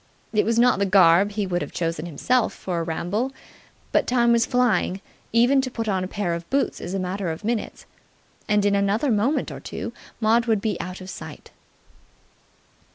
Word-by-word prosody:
It 210 - +2
was 230 0 +1
not 245 -2 +4
the 200 - +1
garb 190 +1 +5
he 205 -1 -1
would 175 -2 -1
have - - -5
chosen 165 -1 -3
himself 235 - +1
for 180 -3 -3
a - - -1
ramble, 180 +10 -2 0.6
but - - +2
time 240 -1 +3
was 235 -1 +3
flying: 245 -6 +1 0.3
even 245 +4 +4
to 260 - -3
put 230 -3 -4
on 190 -3 0
a - - -3
pair 190 -3 -2
of 170 0 -6
boots 275 +1 0
is 180 - -4
a - - -1
matter 185 0 -3
of 160 +3 -5
minutes: 225 0 -3 0.6
and 210 -1 +3
in 205 - +3
another 200 +7 +1
moment 225 +8 +1
or - - -7
two - - -6 0.3
Maud 230 +1 +3
would 220 -2 +2
be 210 -1 -1
out 185 +1 -7
of 185 - -9
sight. - - -10
205 Hz, 195 wpm, -23 LUFS, 185-235 Hz, 0.6 s, garb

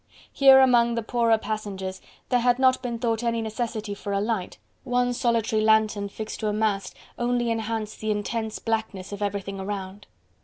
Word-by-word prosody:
Here 270 -1 +7
among 240 -2 +4
the 230 - -2
poorer 230 0 +2
passengers, 195 -4 -5 0.3
there 250 - +3
had 245 0 +3
not 260 -1 +3
been 240 -2 -3
thought 230 -1 -1
any 230 -1 0
necessity 220 -1 -3
for 200 0 -5
a 200 - +1
light, 210 -3 -2 0.3
one 245 -1 +1
solitary 230 -3 +1
lantern 215 -2 +2
fixed 215 +2 -6
to 215 - -2
a 210 - 0
mast 210 -2 -1 0.2
only 240 -1 +1
enhanced 225 -1 -3
the 215 - -2
intense 220 +1 -2
blackness 220 -4 -3
of 205 0 -6
everything 195 -1 -3
around. 195 0 -6
220 Hz, 170 wpm, -25 LUFS, 205-235 Hz, 0.3 s, Here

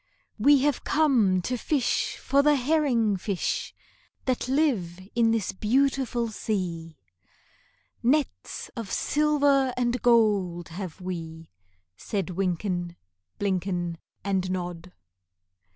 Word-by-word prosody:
"We 280 +4 +6
have 290 -3 +1
come 235 - +3
to 250 +5 -1
fish 275 -2 0
for 280 +1 +2
the 295 +1 +4
herring 250 -7 +2
fish 190 0 -2 0.5
That 255 -2 0
live 250 - +1
in 235 -1 +3
this 225 -3 0
beautiful 245 +2 +1
sea; 175 -7 -3 1.0
Nets 280 +4 -1
of 230 -5 -6
silver 285 -3 +2
and 245 0 0
gold 205 -8 +2
have 185 +1 -7
we," 165 -3 -6 0.5
Said 195 - -3
Wynken, 180 -1 -2 0.4
Blynken, 180 -4 -1 0.2
And 190 -1 0
Nod. 180 -1 -4
210 Hz, 105 wpm, -26 LUFS, 180-260 Hz, 1.0 s, We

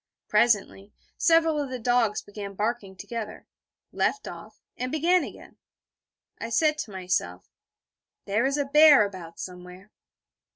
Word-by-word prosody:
Presently, 210 -2 +1 0.2
several 325 -2 +3
of 280 - -4
the 255 - -4
dogs 240 -3 +1
began 200 -1 -8
barking 210 -2 -3
together, 220 0 -7 0.5
left 420 - -1
off, - - -10 0.2
and 255 0 -4
began 345 +4 +2
again. - - -11 0.8
I 230 - -5
said 305 +5 +2
to 220 - -5
myself; 180 - -3 0.7
'There 210 +6 +1
is 275 +1 -1
a 285 - 0
bear 295 -4 +7
about 180 -4 -9
somewhere.' 180 +2 -10
225 Hz, 130 wpm, -26 LUFS, 195-280 Hz, 0.8 s, bear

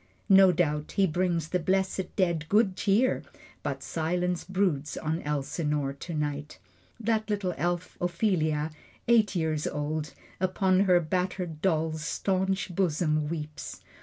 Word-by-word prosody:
No 195 -1 +8
doubt 150 -3 0
he 195 -1 +3
brings 170 -2 0
the 180 - +1
blessed 190 +1 0
dead 170 -5 0
good 205 -2 +3
cheer, 205 +7 +2 0.4
But - - -3
silence 175 +2 -1
broods 180 -7 -1
on 160 +2 -2
Elsinore 150 0 -1
tonight. 150 -1 -4 0.4
That 220 -1 0
little 200 -3 0
elf, 175 +3 -2
Ophelia, 165 -4 +1 0.4
eight 225 -4 +4
years 160 -3 0
old, 150 +1 -3 0.2
Upon 185 +1 +2
her 180 -2 +5
battered 180 -1 -2
doll's 160 -3 0
staunch 190 +2 -1
bosom 155 -4 +1
weeps. 155 -2 -6
175 Hz, 125 wpm, -28 LUFS, 155-190 Hz, 0.4 s, No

